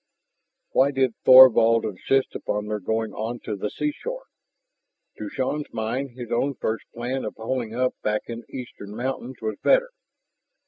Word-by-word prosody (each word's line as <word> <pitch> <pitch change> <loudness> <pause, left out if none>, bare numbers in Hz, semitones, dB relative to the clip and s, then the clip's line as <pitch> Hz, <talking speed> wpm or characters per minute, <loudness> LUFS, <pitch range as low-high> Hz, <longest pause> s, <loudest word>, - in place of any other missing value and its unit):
Why 135 +2 +4
did 130 -3 +1
Thorvald 115 -3 +8
insist 130 +7 0
upon 105 0 -3
their 105 0 -3
going 110 +3 -2
on 115 +3 -4
to 105 - -4
the 100 +1 -3
seashore? 480 - -4 1.0
To 105 - -5
Shann's 145 +3 -3
mind 120 +4 -3
his 120 -2 -7
own 135 +4 0
first 110 -1 -3
plan 125 +3 -3
of - - -5
holing 115 0 -3
up 125 +1 +1
back 105 0 -1
in 115 -1 -6
the - - -26
eastern 105 -5 -9
mountains 130 +1 -4
was 110 -1 -2
better. - - +3
120 Hz, 155 wpm, -24 LUFS, 110-130 Hz, 1.0 s, Thorvald